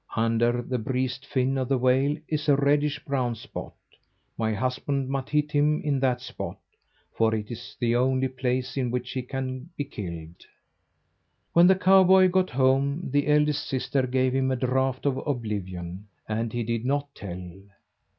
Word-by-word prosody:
Under 115 Hz, +1 st, +1 dB
the 125 Hz, 0 st, -2 dB
breast 130 Hz, +3 st, -2 dB
fin 135 Hz, 0 st, 0 dB
of 130 Hz, -, -2 dB
the 135 Hz, -, +3 dB
whale 130 Hz, +4 st, +2 dB
is 155 Hz, -1 st, -1 dB
a 145 Hz, -, +6 dB
reddish 145 Hz, +1 st, +1 dB
brown 130 Hz, -4 st, -1 dB
spot. 110 Hz, -, -8 dB, 0.6 s
My 110 Hz, -1 st, 0 dB
husband 130 Hz, +4 st, -1 dB
must 135 Hz, -1 st, -3 dB
hit 150 Hz, 0 st, +1 dB
him 150 Hz, +1 st, +2 dB
in 145 Hz, -3 st, +1 dB
that 130 Hz, -2 st, +1 dB
spot, -, -, -6 dB, 0.6 s
for 110 Hz, 0 st, +2 dB
it 105 Hz, 0 st, -5 dB
is 120 Hz, 0 st, -9 dB
the 120 Hz, -1 st, +1 dB
only 130 Hz, +1 st, +2 dB
place 130 Hz, 0 st, -2 dB
in 130 Hz, -2 st, 0 dB
which 125 Hz, +1 st, -3 dB
he 130 Hz, -, -2 dB
can 130 Hz, +3 st, -5 dB
be 145 Hz, -, -1 dB
killed." 85 Hz, -, -8 dB, 1.1 s
When 170 Hz, +1 st, +7 dB
the 190 Hz, -, +6 dB
cowboy 190 Hz, 0 st, +6 dB
got 185 Hz, 0 st, +2 dB
home, 135 Hz, +4 st, +1 dB
the 145 Hz, +1 st, +1 dB
eldest 150 Hz, 0 st, +2 dB
sister 130 Hz, 0 st, 0 dB
gave 130 Hz, 0 st, +1 dB
him 130 Hz, 0 st, +1 dB
a 130 Hz, -, +1 dB
draught 130 Hz, +1 st, 0 dB
of 135 Hz, -2 st, +1 dB
oblivion, 100 Hz, -, -4 dB, 0.2 s
and 110 Hz, +1 st, -2 dB
he 120 Hz, +1 st, -2 dB
did 115 Hz, 0 st, -2 dB
not 140 Hz, +2 st, -1 dB
tell. 90 Hz, -2 st, -7 dB
130 Hz, 170 wpm, -26 LUFS, 120-140 Hz, 1.1 s, When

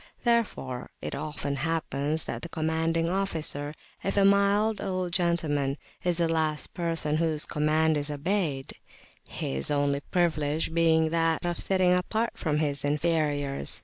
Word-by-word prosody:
Therefore 215 Hz, -, 0 dB
it -, -, -5 dB
often 145 Hz, -2 st, -3 dB
happens 155 Hz, -1 st, -1 dB
that -, -, -4 dB
the 170 Hz, -, -6 dB
commanding 160 Hz, +1 st, 0 dB
officer, 160 Hz, -6 st, -2 dB, 0.3 s
[p.213] -, -, -1 dB
if 195 Hz, -, -2 dB
a 200 Hz, -, +5 dB
mild 200 Hz, +2 st, +3 dB
old 185 Hz, -2 st, -2 dB
gentleman, 155 Hz, -5 st, +1 dB, 0.3 s
is 175 Hz, -2 st, +1 dB
the 170 Hz, -1 st, +2 dB
last 160 Hz, -2 st, -1 dB
person 165 Hz, -3 st, 0 dB
whose 160 Hz, -2 st, +1 dB
command 155 Hz, +1 st, +2 dB
is 145 Hz, 0 st, -1 dB
obeyed, 150 Hz, -2 st, -1 dB, 0.5 s
his 65 Hz, 0 st, -3 dB
only 145 Hz, -1 st, +1 dB
privilege 155 Hz, -1 st, 0 dB
being 160 Hz, -1 st, +3 dB
that 165 Hz, 0 st, +1 dB
of 175 Hz, 0 st, -2 dB
sitting 185 Hz, -2 st, +3 dB
apart 215 Hz, +6 st, 0 dB
from 150 Hz, -4 st, -1 dB
his 145 Hz, -2 st, 0 dB
inferiors. 145 Hz, -2 st, 0 dB
160 Hz, 145 wpm, -28 LUFS, 145-175 Hz, 0.5 s, a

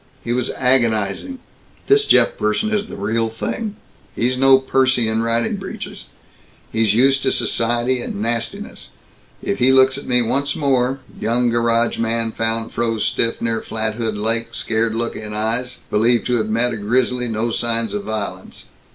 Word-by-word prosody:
He 120 Hz, -, -2 dB
was 125 Hz, 0 st, -1 dB
agonizing, 120 Hz, -, +1 dB, 0.5 s
"This 420 Hz, +1 st, +4 dB
Jeff -, -, +4 dB
person 220 Hz, -, -1 dB
is 210 Hz, 0 st, -1 dB
the -, -, -8 dB
real 110 Hz, +3 st, -1 dB
thing. 210 Hz, -, -4 dB, 0.4 s
He's 125 Hz, +2 st, 0 dB
no 135 Hz, +1 st, +6 dB
Percy 130 Hz, -2 st, +1 dB
in 110 Hz, 0 st, 0 dB
riding 115 Hz, 0 st, 0 dB
breeches. -, -, -8 dB, 0.6 s
He's 110 Hz, -2 st, +1 dB
used 135 Hz, +3 st, +4 dB
to -, -, +1 dB
society 120 Hz, +2 st, +1 dB
and 100 Hz, -, -5 dB
nastiness. 120 Hz, -, -3 dB, 0.5 s
If 200 Hz, -, -2 dB
he 125 Hz, +1 st, +5 dB
looks 130 Hz, 0 st, +4 dB
at -, -, -12 dB
me 125 Hz, -1 st, +4 dB
once 140 Hz, +4 st, 0 dB
more 135 Hz, -2 st, 0 dB, 0.2 s
young 120 Hz, +1 st, +1 dB
garage 115 Hz, 0 st, +1 dB
man 115 Hz, 0 st, 0 dB
found 115 Hz, 0 st, -1 dB
froze 115 Hz, -2 st, -1 dB
stiff, 115 Hz, 0 st, 0 dB
near 115 Hz, -1 st, 0 dB
Flathead 110 Hz, 0 st, -3 dB
Lake, 115 Hz, +2 st, -1 dB
scared 110 Hz, 0 st, -1 dB
look 115 Hz, 0 st, -1 dB
in 105 Hz, -1 st, -6 dB
eyes, 115 Hz, +4 st, -1 dB
believed 115 Hz, +3 st, +2 dB
to 125 Hz, -1 st, +1 dB
have 110 Hz, -1 st, -2 dB
met 115 Hz, +2 st, +2 dB
a -, -, -4 dB
grizzly, 125 Hz, +3 st, 0 dB
no 115 Hz, +1 st, -2 dB
signs 115 Hz, 0 st, 0 dB
of 205 Hz, -1 st, -4 dB
vi'lence. 110 Hz, -2 st, -5 dB
115 Hz, 165 wpm, -19 LUFS, 115-130 Hz, 0.6 s, no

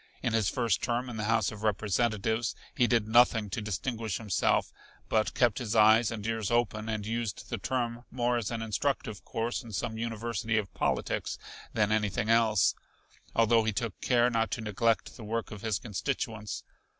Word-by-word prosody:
In 120 Hz, -3 st, 0 dB
his 110 Hz, -4 st, +2 dB
first 115 Hz, -7 st, +1 dB
term 120 Hz, +1 st, -1 dB
in 115 Hz, -, -6 dB
the 110 Hz, -, -2 dB
House 110 Hz, -2 st, +2 dB
of 105 Hz, -1 st, -9 dB
Representatives 110 Hz, 0 st, 0 dB, 0.2 s
he 120 Hz, -, +3 dB
did 115 Hz, -3 st, +2 dB
nothing 115 Hz, -3 st, +4 dB
to 110 Hz, -, -2 dB
distinguish 110 Hz, 0 st, -2 dB
himself, 105 Hz, -5 st, +1 dB, 0.4 s
but 110 Hz, -1 st, +1 dB
kept 120 Hz, -3 st, +3 dB
his 115 Hz, -3 st, -3 dB
eyes 110 Hz, +1 st, +6 dB
and 110 Hz, -3 st, -5 dB
ears 115 Hz, -2 st, -1 dB
open 110 Hz, -2 st, 0 dB
and 110 Hz, -2 st, -2 dB
used 115 Hz, -1 st, -3 dB
the 120 Hz, -, -2 dB
term 120 Hz, +1 st, -2 dB
more 120 Hz, -1 st, 0 dB
as 115 Hz, -4 st, -2 dB
an 115 Hz, -1 st, -3 dB
instructive 110 Hz, -3 st, -2 dB
course 115 Hz, +3 st, -2 dB
in 115 Hz, -3 st, -11 dB
some 110 Hz, +3 st, -3 dB
university 115 Hz, 0 st, -2 dB
of 105 Hz, -4 st, -2 dB
politics -, -, -1 dB, 0.4 s
than 105 Hz, -1 st, +2 dB
anything 105 Hz, 0 st, +1 dB
else, 115 Hz, -3 st, +4 dB, 0.6 s
although 115 Hz, 0 st, +4 dB
he 110 Hz, -, +1 dB
took 115 Hz, -2 st, -3 dB
care 120 Hz, -1 st, +3 dB
not 115 Hz, -1 st, +1 dB
to -, -, -3 dB
neglect 110 Hz, +2 st, 0 dB
the 115 Hz, -, -9 dB
work 115 Hz, +2 st, -3 dB
of 105 Hz, -2 st, -8 dB
his 110 Hz, -1 st, 0 dB
constituents. 110 Hz, -1 st, -3 dB
115 Hz, 180 wpm, -30 LUFS, 105-120 Hz, 0.6 s, eyes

